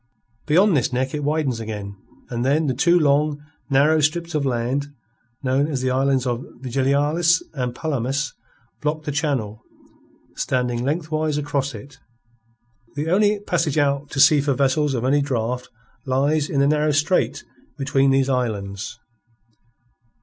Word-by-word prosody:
Beyond 180 +4 +4
this 130 -3 +1
neck 130 +1 -1
it 150 -1 -3
widens 145 -5 0
again, 105 -3 -6 0.4
and 120 0 -2
then 145 +5 +2
the 135 - 0
two 170 +7 +3
long, 150 0 +2 0.3
narrow 145 +3 +4
strips 165 +3 0
of 145 -3 0
land 130 +3 -1 0.6
known 135 +2 +1
as 140 -5 -2
the 130 - +1
islands 135 0 +1
of 120 0 -2 0.2
Vigilias 140 +6 +1
and 125 -4 -3
Palomas 140 -2 -2 0.5
block 155 +1 -2
the 150 - -3
channel, 135 -8 -2 0.7
standing 125 -2 -1
lengthwise 155 +1 -1
across 140 -2 -2
it. 135 -1 -12 1.0
The 150 +3 -2
only 205 +2 +3
passage 165 -7 -1
out 140 -1 +1
to 135 - -4
sea 145 +1 +6
for 140 -1 0
vessels 140 +1 +1
of 120 0 -2
any 145 +2 +3
draught 125 -2 -2 0.4
lies 145 +3 +1
in 140 - +1
the 140 - +4
narrow 150 0 +2
strait 145 -3 +1 0.3
between 135 -1 +2
these 135 0 +3
islands. 110 -5 -2
140 Hz, 145 wpm, -22 LUFS, 130-150 Hz, 1.0 s, sea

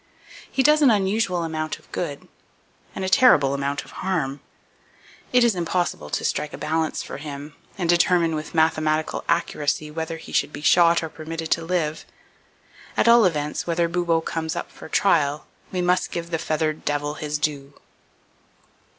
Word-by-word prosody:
He 265 - +2
does 300 +2 +5
an 280 - +6
unusual 195 -3 +1
amount 155 -1 -3
of - - -24
good, 145 -5 -4 0.7
and 190 - -3
a - - -1
terrible 185 - +5
amount 140 +1 -2
of - - -15
harm. 155 -8 -1 0.9
It 250 -1 +5
is 235 -2 +4
impossible 175 - -2
to - - -2
strike 150 - -1
a - - -6
balance 160 0 -1
for - - -7
him, 145 0 -8 0.2
and 180 -3 -1
determine 175 -1 +3
with 155 +2 -5
mathematical 155 -1 +1
accuracy 155 -2 0
whether 160 +1 -4
he 160 - -12
should - - +1
be - - -8
shot 170 +1 +5
or 160 - -4
permitted 160 +1 -6
to 165 - +2
live. 165 -3 -2 0.9
At - - +3
all 235 -2 +7
events, 150 -3 -1
whenever 170 0 +1
Bubo 170 -1 +1
comes 160 -1 -3
up - - -5
for - - -12
trial, 150 -7 +2 0.3
we 185 - -1
must 180 +1 +2
give 170 0 -5
the 165 - -1
feathered 155 -1 -1
devil 145 0 -1
his 150 -1 -3
due. 145 -2 -3
160 Hz, 170 wpm, -23 LUFS, 150-175 Hz, 0.9 s, all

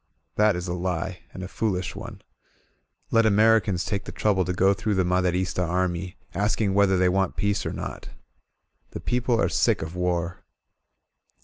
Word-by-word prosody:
That 105 -2 +4
is 90 +1 -4
a 85 - -2
lie, 90 0 -3
and 95 - -8
a - - -4
foolish 95 -3 -2
one. 105 0 -9 0.9
Let 115 -1 +4
Americans 105 -3 +3
take 100 -3 -2
the - - -6
trouble 100 -3 +1
to 90 - -1
go 95 +2 +3
through 105 +1 -1
the 95 - +2
Maderista 90 0 0
army, 90 +1 -1 0.2
asking 105 0 0
whether 100 -1 +4
they 90 0 +3
want 95 0 +1
peace 100 -1 0
or - - -2
not! - - -6 0.8
The - - -5
people 120 -1 0
are - - +3
sick - - +1
of 80 +2 -7
war. 90 -1 -1
95 Hz, 170 wpm, -25 LUFS, 90-105 Hz, 0.9 s, That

